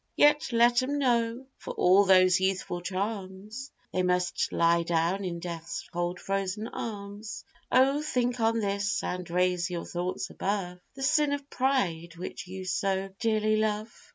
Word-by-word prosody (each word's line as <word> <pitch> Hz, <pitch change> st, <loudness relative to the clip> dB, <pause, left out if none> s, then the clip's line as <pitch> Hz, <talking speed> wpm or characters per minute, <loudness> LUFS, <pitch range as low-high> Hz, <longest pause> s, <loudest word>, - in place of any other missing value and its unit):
Yet 295 Hz, -1 st, +4 dB
let 240 Hz, +1 st, +5 dB
'em 280 Hz, +3 st, -1 dB
know, 240 Hz, -2 st, +1 dB
for -, -, -7 dB
all 190 Hz, +3 st, +5 dB
those 185 Hz, -1 st, +6 dB
youthful 190 Hz, -2 st, -1 dB
charms, 200 Hz, +6 st, -4 dB, 0.2 s
They 185 Hz, -, +1 dB
must 180 Hz, 0 st, 0 dB
lie 170 Hz, 0 st, +3 dB
down 170 Hz, +3 st, 0 dB
in 175 Hz, -2 st, -3 dB
death's 170 Hz, -1 st, -6 dB
cold 175 Hz, +1 st, -2 dB
frozen 195 Hz, +2 st, -2 dB
arms! 205 Hz, -1 st, -6 dB, 0.3 s
Oh 275 Hz, +3 st, +4 dB
think 250 Hz, -5 st, 0 dB
on 225 Hz, 0 st, +2 dB
this, 200 Hz, 0 st, -1 dB
and 180 Hz, -1 st, -4 dB
raise 180 Hz, +1 st, +1 dB
your 175 Hz, -1 st, -4 dB
thoughts 175 Hz, -7 st, -3 dB
above 190 Hz, -3 st, -2 dB, 0.2 s
The 270 Hz, -, -6 dB
sin 295 Hz, +1 st, +3 dB
of 285 Hz, 0 st, -4 dB
pride, 175 Hz, -11 st, 0 dB
which 180 Hz, +1 st, -7 dB
you 190 Hz, +1 st, -7 dB
so 190 Hz, +1 st, 0 dB
dearly 215 Hz, -1 st, +2 dB
love. 215 Hz, 0 st, -1 dB
195 Hz, 155 wpm, -28 LUFS, 180-230 Hz, 0.3 s, those